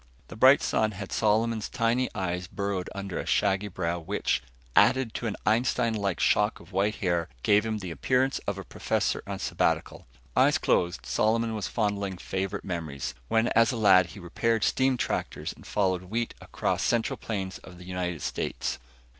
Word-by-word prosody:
The -, -, -8 dB
bright 130 Hz, +5 st, +6 dB
sun 110 Hz, -1 st, +1 dB
had 100 Hz, 0 st, -7 dB
Solomon's 110 Hz, 0 st, +1 dB
tiny 125 Hz, +1 st, +1 dB
eyes 90 Hz, -2 st, -2 dB
burrowed 100 Hz, -1 st, -3 dB
under 100 Hz, -2 st, -4 dB
a -, -, -4 dB
shaggy 95 Hz, +2 st, +2 dB
brow 85 Hz, -3 st, -2 dB
which, 95 Hz, +5 st, -1 dB, 0.3 s
added 130 Hz, -4 st, +4 dB
to 120 Hz, -, -3 dB
an 105 Hz, -, -2 dB
Einstein 115 Hz, +1 st, +2 dB
like 100 Hz, -5 st, -1 dB
shock 105 Hz, +1 st, +2 dB
of 85 Hz, +3 st, -16 dB
white 100 Hz, +3 st, +1 dB
hair, 85 Hz, -3 st, 0 dB
gave 105 Hz, +2 st, +4 dB
him 110 Hz, -1 st, -1 dB
the 95 Hz, -4 st, -6 dB
appearance 130 Hz, -, +1 dB
of 100 Hz, -1 st, -1 dB
a 95 Hz, -, -6 dB
professor -, -, -1 dB
on -, -, -3 dB
sabbatical. -, -, -1 dB, 0.3 s
Eyes -, -, +5 dB
closed, 85 Hz, -1 st, +1 dB
Solomon 115 Hz, +1 st, +1 dB
was 105 Hz, -2 st, -3 dB
fondling 100 Hz, -4 st, -1 dB
favorite 95 Hz, +1 st, -3 dB
memories, 75 Hz, -7 st, -4 dB
when 115 Hz, -, +2 dB
as 115 Hz, +2 st, +4 dB
a 125 Hz, -, -3 dB
lad 95 Hz, -5 st, +6 dB
he 100 Hz, -, -11 dB
repaired 110 Hz, +5 st, 0 dB
steam 130 Hz, -1 st, +2 dB
tractors -, -, -2 dB
and -, -, -15 dB
followed 95 Hz, -3 st, 0 dB
wheat 115 Hz, +5 st, -2 dB
across -, -, -2 dB
central 115 Hz, -2 st, +1 dB
plains 95 Hz, -4 st, -4 dB
of 90 Hz, -2 st, -13 dB
the 90 Hz, -, -12 dB
United 90 Hz, -4 st, -3 dB
States. -, -, -3 dB
100 Hz, 175 wpm, -28 LUFS, 90-115 Hz, 0.3 s, bright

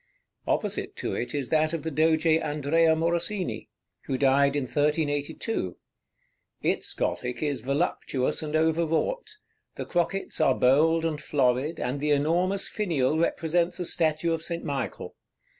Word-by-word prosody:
Opposite -, -, -1 dB
to -, -, -3 dB
it 120 Hz, -, -3 dB
is 140 Hz, -3 st, -2 dB
that 155 Hz, 0 st, +2 dB
of 165 Hz, -, -3 dB
the 160 Hz, -, -3 dB
Doge 160 Hz, +2 st, +2 dB
Andrea 160 Hz, 0 st, +3 dB
Morosini, 170 Hz, +4 st, -1 dB, 0.4 s
who 130 Hz, -, -1 dB
died 140 Hz, +1 st, +3 dB
in 145 Hz, -, 0 dB
1382. 145 Hz, -, -1 dB, 0.9 s
Its -, -, 0 dB
Gothic 125 Hz, +4 st, -2 dB
is 145 Hz, -5 st, -1 dB
voluptuous, 135 Hz, -1 st, -1 dB
and 155 Hz, 0 st, -3 dB
over 160 Hz, +1 st, +2 dB
wrought; 460 Hz, -, -1 dB, 0.5 s
the -, -, -5 dB
crockets 175 Hz, +3 st, -1 dB
are 130 Hz, -, +4 dB
bold 160 Hz, +6 st, +3 dB
and 155 Hz, -2 st, -2 dB
florid, 135 Hz, +3 st, 0 dB
and 130 Hz, +3 st, -2 dB
the 150 Hz, +1 st, -1 dB
enormous 175 Hz, +7 st, +2 dB
finial 160 Hz, -, 0 dB
represents 170 Hz, +2 st, 0 dB
a 180 Hz, -, -2 dB
statue 160 Hz, 0 st, +1 dB
of 165 Hz, -, -2 dB
St. 170 Hz, 0 st, -3 dB
Michael. 140 Hz, -4 st, -4 dB
155 Hz, 140 wpm, -27 LUFS, 140-165 Hz, 0.9 s, are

